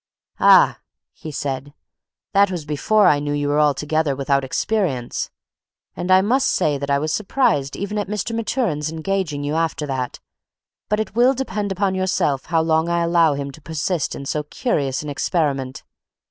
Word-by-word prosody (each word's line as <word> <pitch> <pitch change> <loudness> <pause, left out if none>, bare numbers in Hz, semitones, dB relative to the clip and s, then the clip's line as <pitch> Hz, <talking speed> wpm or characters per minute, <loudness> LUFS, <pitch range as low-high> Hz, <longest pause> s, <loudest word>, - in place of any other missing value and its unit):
"Ah," - - +6 0.5
said 135 -2 -3
he, 145 - -17 0.6
"that 200 0 +5
was 175 -5 -4
before 195 +8 +2
I 145 - +5
knew 145 0 -2
you 145 0 -1
were 145 +1 +2
altogether 150 0 +1
without 140 0 +1
experience; 135 - -1 0.7
and 180 - -4
I 185 0 +6
must 260 +6 +2
say 145 -2 +1
that 140 0 -4
I 140 - +3
was 155 +2 -1
surprised 210 - +1
even 205 +1 -3
at 205 - -3
Mr. 210 +2 -3
Maturin's 210 - -1
engaging 160 -3 -2
you 145 +1 -2
after 160 -1 -1
that; 130 -3 -3 0.7
but 210 +1 +1
it 215 - -3
will 250 +3 +4
depend 210 -6 -3
upon 195 0 0
yourself 185 -7 0
how 165 -2 +1
long 160 +1 +1
I 170 0 +1
allow 170 -3 +3
him 140 0 -4
to 155 - -15
persist 160 +1 -2
in 140 - -7
so 150 +2 -1
curious 145 - -2
an 150 - -5
experiment. 140 -4 -1
160 Hz, 175 wpm, -21 LUFS, 145-195 Hz, 0.7 s, Ah